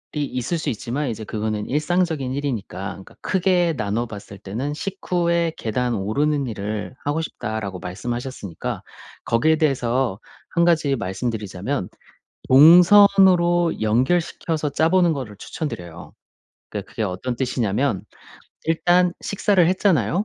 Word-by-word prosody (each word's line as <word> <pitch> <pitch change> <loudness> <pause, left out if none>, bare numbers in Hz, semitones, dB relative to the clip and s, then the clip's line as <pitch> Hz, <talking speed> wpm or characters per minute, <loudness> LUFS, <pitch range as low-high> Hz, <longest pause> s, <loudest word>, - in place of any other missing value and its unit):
있을 145 +1 -2
수 160 - -2
있지만 125 +6 -3
이제 110 -1 -5
그거는 105 0 -3
일상적인 150 -2 0
일이니까 120 -9 -3
그러니까 95 - -11
크게 180 -3 +2
나눠봤을 105 -1 -4
때는 115 +9 -4
"식후에 170 -1 -1
계단 120 +2 -1
오르는 140 +8 0
일을 105 +1 -4
하고 145 +3 -1
싶다."라고 110 - -5
말씀하셨으니까 120 0 -5 0.4
거기에 135 +8 +2
대해서 130 -7 0 0.3
1 170 0 +2
가지 160 -5 +2
말씀드리자면 105 +1 -3 0.6
동선으로 175 +2 +6
연결시켜서 150 +6 0
짜 160 +3 +2
보는 175 -2 +4
거를 125 -8 -6
추천 155 +8 -5
드려요. 85 - -9 0.6
그러니까 100 -2 -6
그게 115 - -4
어떤 105 +6 -3
뜻이냐면 125 -3 0 0.6
일단 175 +2 +3
식사를 200 -3 +2
했잖아요. 185 - +2
135 Hz, 320 characters per minute, -22 LUFS, 110-170 Hz, 0.6 s, 동선으로